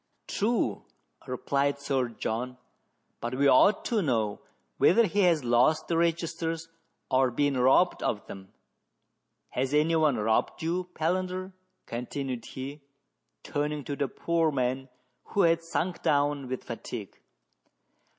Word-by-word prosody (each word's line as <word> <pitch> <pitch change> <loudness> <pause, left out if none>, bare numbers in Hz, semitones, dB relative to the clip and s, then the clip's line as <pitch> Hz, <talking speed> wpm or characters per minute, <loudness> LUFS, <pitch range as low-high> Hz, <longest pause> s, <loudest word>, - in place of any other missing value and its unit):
" - - -47
True," 205 - 0 0.4
replied 140 +2 0
Sir 135 -3 0
John, 120 +2 -4 0.3
" - - -47
but 120 +2 -3
we 140 +2 +3
ought 140 +10 +5
to 225 -3 +1
know 110 - 0 0.4
whether 230 +5 +5
he 205 +1 -1
has 170 -7 +4
lost 125 +6 +3
the 170 - 0
registers 165 -1 -1 0.4
or 130 0 +4
been 140 +3 +1
robbed 130 +8 +4
of 105 - -1
them.. 95 -1 -10 1.0
Has 135 +3 -1
any 155 +2 +3
one 155 -4 +3
robbed 110 +7 0
you, 175 +3 -1
Palander 185 +3 -1 0.2
?" - - -50
continued 125 +1 -4
he, 140 +3 -7 0.6
turning 150 0 -2
to 145 - -4
the 140 - -1
poor 165 +1 0
man, 130 0 -1 0.4
who 200 - 0
had 165 -2 +4
sunk 165 +1 -2
down 145 -2 +1
with 130 0 -4
fatigue. - - -7
145 Hz, 140 wpm, -28 LUFS, 130-165 Hz, 1.0 s, ought